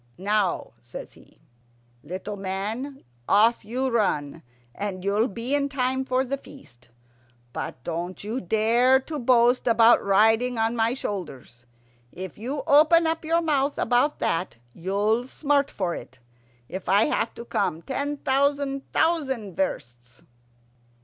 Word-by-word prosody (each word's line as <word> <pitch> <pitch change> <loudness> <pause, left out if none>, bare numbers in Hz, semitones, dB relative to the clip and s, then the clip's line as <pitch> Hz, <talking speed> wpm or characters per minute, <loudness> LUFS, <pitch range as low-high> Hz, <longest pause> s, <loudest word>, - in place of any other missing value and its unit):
"Now," 200 0 0
says 120 0 -10
he, - - -21 0.6
"little 185 +8 -6
man, 210 +8 -4 0.3
off 220 +4 +4
you 250 +5 -2
run, 165 -9 0 0.3
and 195 -3 -5
you'll 205 +4 +2
be 235 +5 -4
in 285 -1 +1
time 260 -1 -1
for 260 +1 +1
the 275 +2 -2
feast. 130 - -16 0.6
But 125 - -6
don't 175 +4 -5
you 225 +5 -3
dare 230 +7 +3
to 300 +2 -6
boast 245 0 +3
about 230 0 +5
riding 225 +5 +3
on 225 +1 +1
my 230 +1 +1
shoulders. 135 - -7 0.4
If 185 -1 -8
you 265 +6 -4
open 315 +4 +5 0.2
your 330 +1 +1
mouth 285 -3 +1
about 250 +5 +2
that 180 +3 -1 0.2
you'll 205 +7 0
smart 285 0 +1
for 180 -3 -2
it, 130 - -9 0.5
if 185 +5 -6
I 200 +3 +5
have 225 - -1
to 235 - -8
come 170 -7 -1
ten 285 +2 -3
thousand 275 0 0
thousand 265 - 0
versts." 120 -8 -4
230 Hz, 135 wpm, -25 LUFS, 190-265 Hz, 0.6 s, about